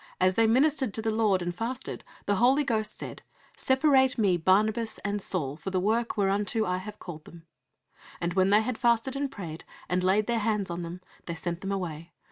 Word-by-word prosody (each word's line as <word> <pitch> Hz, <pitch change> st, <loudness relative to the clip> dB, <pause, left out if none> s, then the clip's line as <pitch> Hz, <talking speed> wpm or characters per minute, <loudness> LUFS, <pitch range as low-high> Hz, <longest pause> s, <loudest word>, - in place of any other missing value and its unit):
As 185 Hz, 0 st, +4 dB
they 225 Hz, +3 st, +3 dB
ministered 265 Hz, 0 st, +2 dB
to 220 Hz, -, -2 dB
the 220 Hz, -, +1 dB
Lord, 210 Hz, -4 st, +2 dB
and 175 Hz, 0 st, -2 dB
fasted, 235 Hz, +7 st, -5 dB, 0.2 s
the 205 Hz, -1 st, +1 dB
Holy 260 Hz, +6 st, +4 dB
Ghost 220 Hz, -5 st, -1 dB
said, -, -, -7 dB, 0.3 s
Separate 265 Hz, -1 st, +3 dB
Me 200 Hz, -5 st, +3 dB
Barnabas 215 Hz, +6 st, +2 dB
and 200 Hz, 0 st, -1 dB
Saul 145 Hz, -8 st, -1 dB
for 190 Hz, -, -5 dB
the 185 Hz, -1 st, 0 dB
work 225 Hz, +5 st, 0 dB
whereunto 205 Hz, +2 st, +1 dB
I 180 Hz, -1 st, 0 dB
have 210 Hz, +3 st, -8 dB
called 155 Hz, -4 st, -9 dB
them. 165 Hz, -1 st, -14 dB, 0.7 s
And 170 Hz, 0 st, -2 dB
when 190 Hz, +1 st, +3 dB
they 210 Hz, +2 st, +5 dB
had 225 Hz, +1 st, -3 dB
fasted 240 Hz, +1 st, +2 dB
and 280 Hz, 0 st, -1 dB
prayed, 170 Hz, -9 st, -7 dB, 0.2 s
and 180 Hz, 0 st, 0 dB
laid 195 Hz, +3 st, +3 dB
their 235 Hz, 0 st, 0 dB
hands 210 Hz, -4 st, -1 dB
on 170 Hz, +1 st, -4 dB
them, 175 Hz, +2 st, -7 dB, 0.3 s
they 170 Hz, -, -3 dB
sent 170 Hz, +1 st, -4 dB
them 195 Hz, -, -3 dB
away. 170 Hz, -4 st, -4 dB
205 Hz, 205 wpm, -28 LUFS, 180-230 Hz, 0.7 s, they